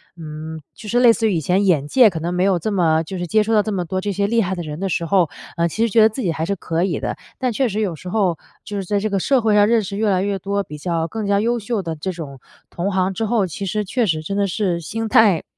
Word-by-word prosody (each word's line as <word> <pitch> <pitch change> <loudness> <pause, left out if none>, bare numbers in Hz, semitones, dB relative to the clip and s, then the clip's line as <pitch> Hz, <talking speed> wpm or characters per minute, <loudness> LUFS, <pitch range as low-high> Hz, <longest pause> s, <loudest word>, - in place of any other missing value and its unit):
嗯， 160 -1 -7
就 215 - -10
是 240 +2 +2
类 240 -2 +7
似 225 0 0
于 190 - 0
以 - - +1
前 180 +6 +1
眼 150 -6 +2
界 240 - +6
可 165 - -5
能 170 +2 -3
没 180 - +1
有 190 -1 +3
这 210 +6 -3
么 165 -4 +2
就 185 +3 -6
是 175 - -3
接 215 +5 +3
触 225 +2 -1
到 210 - +5
这 215 - -3
么 180 -3 -2
多 185 +3 -2
这 205 +1 -2
些 200 +1 0
厉 230 +3 +2
害 190 -2 -1
的 175 - -5
人 150 0 -6
的 195 0 -2
时 170 - -1
候， 175 -2 +2 0.3
呃， 170 0 +1
其 225 +7 0
实 - - -1
觉 225 - +6
得 220 - +7
自 230 +3 -5
己 175 - +1
还 160 0 -3
是 200 - 0
可 170 -1 -2
以 190 - -1
的， - - -3 0.2
但 255 -2 -1
确 260 +2 +1
实 210 +1 -2
有 195 -6 -1
时 180 +4 -9
候 185 -6 +1 0.2
就 210 - -7
是 195 - -2
在 205 +3 -1
这 215 0 -2
个 195 - +1
社 270 +7 +2
会 220 -2 +2
上 205 0 +5
认 230 -1 +3
识 200 +1 -5
越 215 -1 +1
来 190 -1 +2
越 200 -1 -1
多 200 +2 -1
比 150 -5 -10
较 165 0 -1
更 215 +4 -4
加 200 0 +3
优 235 +3 0
秀 215 -2 -2
的 165 -1 -4
这 185 +5 -4
种 145 -6 -8 0.3
同 185 +4 -2
行 190 0 0
之 225 - -3
后， 220 -3 +2
其 190 +3 -5
实 210 +2 -1
确 235 +3 0
实 155 -3 -1
真 195 +5 -4
的 200 -1 +1
是 185 -2 -1
心 225 +7 -4
态 215 -7 +4
195 Hz, 335 characters per minute, -20 LUFS, 170-215 Hz, 0.3 s, 类